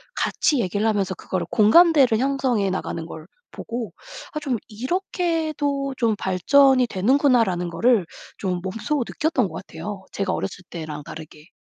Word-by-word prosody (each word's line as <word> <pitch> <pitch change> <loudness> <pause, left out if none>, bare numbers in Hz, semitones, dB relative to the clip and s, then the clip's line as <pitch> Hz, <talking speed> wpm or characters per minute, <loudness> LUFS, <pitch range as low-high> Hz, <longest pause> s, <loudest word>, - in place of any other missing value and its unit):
같이 290 -5 +1
얘기를 205 +2 -1
하면서 200 -4 0
그거를 185 -2 -3
공감대를 260 +1 +5
형성해 255 -7 +1
나가는 170 -3 -3
걸 160 -1 -10 0.2
보고 235 -1 -6 0.4
아 305 - -2
좀 270 -6 -1
'이렇게도 295 - -2
좀 230 -3 +1
발전이 255 +8 +4
되는구나.'라는 225 - +2
거를 205 +3 +2 0.3
좀 180 -2 -2
몸소 225 +8 -2
느꼈던 300 - 0
것 160 - -12
같아요, 190 +5 -7
제가 195 -2 -2
어렸을 185 -1 -4
때랑 155 -3 -6
다르게. 155 -1 -11
225 Hz, 320 characters per minute, -23 LUFS, 185-275 Hz, 0.4 s, 공감대를